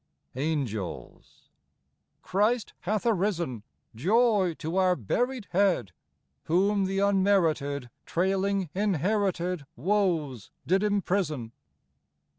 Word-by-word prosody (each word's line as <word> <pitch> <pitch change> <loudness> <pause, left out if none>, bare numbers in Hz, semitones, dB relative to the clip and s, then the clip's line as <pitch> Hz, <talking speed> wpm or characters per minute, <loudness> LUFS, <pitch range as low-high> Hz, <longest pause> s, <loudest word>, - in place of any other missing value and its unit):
Angels. 130 - -4 0.7
Christ 215 +3 +1
hath 205 +6 -2
arisen! 175 - 0 0.3
Joy 195 - +2
to 165 +4 -3
our 185 -1 +4
buried 240 - -1
Head! 185 - +2 0.5
Whom 195 +4 +2
the 195 +1 -2
unmerited, 170 - +1 0.2
Trailing 190 0 0
inherited 185 -4 0
Woes, 160 - 0 0.2
did 190 +3 +2
imprison 185 - 0
185 Hz, 80 wpm, -28 LUFS, 155-200 Hz, 0.7 s, our